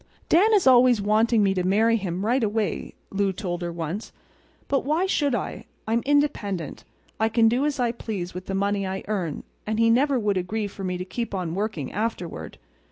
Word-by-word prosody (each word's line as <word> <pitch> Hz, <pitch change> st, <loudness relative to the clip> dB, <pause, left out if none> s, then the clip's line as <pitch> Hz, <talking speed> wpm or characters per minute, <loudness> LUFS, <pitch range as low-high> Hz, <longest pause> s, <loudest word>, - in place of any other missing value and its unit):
"Dan 395 Hz, +7 st, +5 dB
is 395 Hz, -, +3 dB
always 250 Hz, -2 st, +6 dB
wanting 215 Hz, +2 st, +3 dB
me 195 Hz, -1 st, +3 dB
to 185 Hz, -, 0 dB
marry 220 Hz, +5 st, +3 dB
him 190 Hz, -2 st, -2 dB
right 245 Hz, +3 st, +2 dB
away," 215 Hz, 0 st, -2 dB, 0.2 s
Lou 200 Hz, 0 st, +1 dB
told 180 Hz, -2 st, -4 dB
her 175 Hz, 0 st, -3 dB
once. 170 Hz, +5 st, -5 dB, 0.6 s
"But 275 Hz, -, +1 dB
why 310 Hz, +6 st, +1 dB
should 290 Hz, -8 st, +1 dB
I? 225 Hz, -, -4 dB, 0.2 s
I'm 230 Hz, +2 st, +1 dB
independent. 210 Hz, -, 0 dB, 0.4 s
I 220 Hz, 0 st, +2 dB
can 225 Hz, 0 st, +4 dB
do 250 Hz, +6 st, +2 dB
as 290 Hz, -2 st, -2 dB
I 240 Hz, -2 st, +2 dB
please 205 Hz, -6 st, -5 dB
with 180 Hz, +1 st, -7 dB
the 195 Hz, -, -2 dB
money 200 Hz, 0 st, 0 dB
I 190 Hz, 0 st, -4 dB
earn; 185 Hz, -8 st, -2 dB, 0.2 s
and 215 Hz, 0 st, -1 dB
he 230 Hz, 0 st, +5 dB
never 270 Hz, +3 st, +3 dB
would 205 Hz, -4 st, 0 dB
agree 205 Hz, +4 st, -2 dB
for 200 Hz, -1 st, -7 dB
me 180 Hz, -1 st, -2 dB
to 180 Hz, -, -5 dB
keep 230 Hz, +2 st, -4 dB
on 175 Hz, -3 st, -3 dB
working 190 Hz, -, -3 dB
afterward. 180 Hz, -, -4 dB
210 Hz, 200 wpm, -25 LUFS, 190-235 Hz, 0.6 s, always